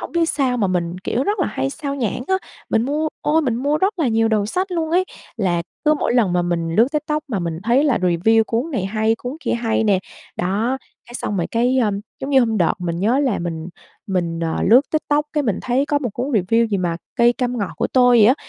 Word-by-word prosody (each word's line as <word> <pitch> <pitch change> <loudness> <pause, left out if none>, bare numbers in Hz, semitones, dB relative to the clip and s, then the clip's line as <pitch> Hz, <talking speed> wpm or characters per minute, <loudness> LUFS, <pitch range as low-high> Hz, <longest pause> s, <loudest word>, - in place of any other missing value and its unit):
hổng - - -7
biết 335 -1 +2
sao 260 -4 0
mà 205 -4 +1
mình, 175 -1 -2
kiểu, 240 +7 -1
rất 415 +1 0
là - - +2
hay 135 +1 -2
xao 280 - -4
nhãng 245 -3 -2
á. 380 - +3 0.4
Mình 220 - +2
mua, 300 +5 -1
ôi, 315 +2 +2
mình 245 -5 0
mua 285 +4 0
rất 385 +1 0
là 295 - +2
nhiều 225 0 +2
đầu 215 -2 +1
sách 370 - -2
luôn 325 -2 -1
ấy. 365 +3 +3 0.3
Là 175 -5 0 0.2
cứ 305 0 +4
mỗi 290 - -1
lần 220 -7 +3
mà 175 0 +2
mình 170 -1 -2
lướt 230 +3 +5
TikTok 300 0 -1
mà 220 -6 -1
mình 170 -2 -3
thấy 245 +6 +3
là 280 -5 +2
review 185 +5 +3
cuốn 235 +9 -2
này 245 - -2
hay, 220 +2 +1
cuốn 250 +4 -5
kia - - -1
hay 225 -1 0
nè, 200 -3 +3 0.4
đó, 215 +9 0 0.3
cái 240 - -13
xong 210 -4 -3
rồi 170 - 0
cái, 245 +3 +2
ờ, 225 -4 +2 0.3
giống 270 - -4
như 270 - +5
hôm 225 -3 +1
đợt 170 - +2
mình 170 -2 -3
nhớ 230 +7 +2
là 265 -7 +1
mình 170 -1 -4 0.4
mình, 175 -4 -1
ờ, 165 -1 -1
lướt 235 +6 +6
TikTok 300 -1 +1
cái 300 -1 +1
mình 215 -7 -1
thấy 260 +3 +1
có 290 -1 +1
một 250 -6 -3
cuốn 240 +5 -3
review 225 +2 +2
gì 210 - -1
mà 175 -2 -1 0.2
Cây 240 0 +5
cam 245 0 -2
ngọt 200 -3 -2
của - - 0
tôi 245 -2 +4
vậy 210 - +7
á, 250 - +6
235 Hz, 255 wpm, -20 LUFS, 190-275 Hz, 0.4 s, vậy